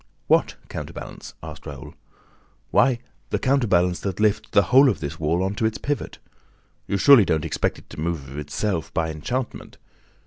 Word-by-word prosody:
"What - - +3
counterbalance?" - - -8
asked - - -9
Raoul. 70 -3 -8 0.8
"Why, 120 +5 +4 0.3
the - - 0
counterbalance 100 -10 +2
that 95 -1 -4
lifts 110 0 +1
the 100 - +4
whole 135 +1 +8
of 100 -10 -1
this 75 +3 -5
wall 80 +4 +1
on 95 +1 -1
to 110 - -1
its 110 - -3
pivot. 145 0 -3 0.7
You 100 - 0
surely 135 +2 +8
don't 80 -5 0
expect - - -1
it - - -16
to - - -9
move 80 -4 -2
of 70 +2 -7
itself, 85 +3 -2
by 80 -1 0
enchantment! 120 - -4
95 Hz, 170 wpm, -23 LUFS, 80-110 Hz, 0.8 s, whole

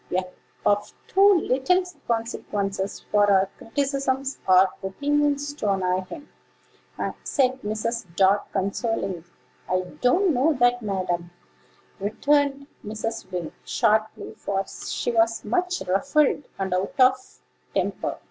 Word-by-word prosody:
We 180 - 0
are 185 - 0 0.4
of 205 0 +2
too 390 -2 +5
little 275 +9 +2 0.2
consequence 200 -4 -2
for 205 -1 +4
our 190 0 +4
criticisms 275 +1 -1
or 185 0 +6
opinions 290 +7 0
to 215 -8 -2
annoy 185 -1 0
him," 295 - -10 1.0
said 260 -1 +1
Mrs. 220 +1 -2
Dart 195 +2 +3
consolingly. 195 -2 -2 0.5
"I 185 0 +2 0.2
don't 345 +8 +3
know 280 +5 +3
that, 245 -2 +3
ma'am," 185 -4 -2 0.7
returned 280 +7 +1 0.2
Mrs. 215 -1 -4
Wing, 175 -3 -4
sharply: 220 -2 0
for 195 0 -1
she - - -3
was 225 0 +2
much 360 - 0
ruffled 275 +9 +2
and 190 -1 -2
out 195 +10 -2
of 255 0 +3 0.3
temper. - - -1
225 Hz, 120 wpm, -25 LUFS, 195-275 Hz, 1.0 s, or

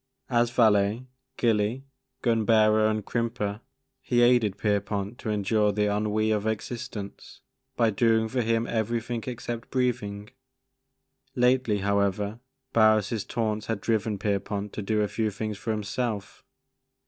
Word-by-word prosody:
As 120 -1 +3
valet, 110 0 +3 0.3
gilly, 115 +2 +1 0.4
gun 115 -2 +2
bearer, 110 -1 +4
and 110 -1 -1
crimper, 115 -3 -2 0.4
he 120 -1 +2
aided 120 -5 +3
Pierpont 100 +1 -1
to 110 - -4
endure 105 0 +2
the 105 0 +1
ennui 110 +1 0
of 105 0 0
existence, 110 -1 -5 0.3
by 115 -2 +3
doing 110 +1 +2
for 125 +3 -1
him 115 0 +1
everything 115 +1 -2
except 120 -1 -5
breathing. 115 -5 -2 1.0
Lately, 125 -3 +3
however, 100 +2 0 0.3
Barris' 110 -1 +3
taunts 110 -2 -2
had 115 -2 -1
driven 110 -1 0
Pierpont 100 0 -2
to - - -4
do 105 +1 0
a 105 - +1
few 110 +1 -1
things 105 0 -5
for 115 - -6
himself. 105 0 -3
110 Hz, 130 wpm, -27 LUFS, 105-115 Hz, 1.0 s, bearer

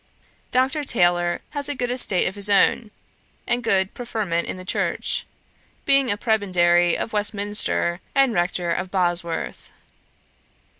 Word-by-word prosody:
Dr. 260 +4 +1
Taylor 175 -8 +1
had 285 -1 -3
a 290 - -2
good 245 -1 -2
estate 225 -7 +2
of 180 - -3
his 205 0 -2
own, 210 +2 +3 0.6
and 240 0 -1
good 195 -4 +1
preferment 215 -8 -3
in - - -5
the 185 - -9
church, - - -1 0.6
being 275 -2 +4
a 205 - 0
prebendary 175 -6 +2
of 225 - -5
Westminster, 205 -4 0
and 270 -3 +3
rector 175 -1 -1
of 185 +2 -2
Bosworth. 175 -3 -2
200 Hz, 135 wpm, -22 LUFS, 175-240 Hz, 0.6 s, being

